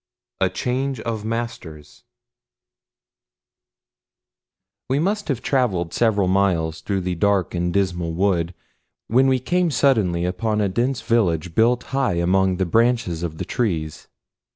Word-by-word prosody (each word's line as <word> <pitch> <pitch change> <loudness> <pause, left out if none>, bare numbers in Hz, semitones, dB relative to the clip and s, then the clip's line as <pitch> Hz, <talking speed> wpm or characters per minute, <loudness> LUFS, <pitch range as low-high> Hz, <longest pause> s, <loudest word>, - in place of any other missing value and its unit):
III 95 - +4
A - - -3
CHANGE 130 +6 -2
OF 110 -2 -4
MASTERS 115 -10 -6 2.9
WE 135 - +1
MUST 200 +7 -1
HAVE 130 -5 -2
TRAVELED 100 - 0
SEVERAL 105 -5 +2
MILES 90 -4 +1
THROUGH 100 -2 -2
the 90 0 -2
dark 100 +2 +1
and 90 0 -1
dismal 90 -3 -1
wood 90 -1 0 0.5
when 130 +4 +3
we 130 -1 +3
came 175 +7 0
suddenly 110 - +2
upon 105 +4 -1
a 105 - +2
dense 120 +7 -1
village 90 -8 +1
built 120 +5 +3
high 135 -9 +1
among 90 +2 +2
the 95 - 0
branches 115 -4 +1
of 80 -2 -4
the - - -4
trees. 80 - -2
100 Hz, 135 wpm, -22 LUFS, 90-120 Hz, 2.9 s, III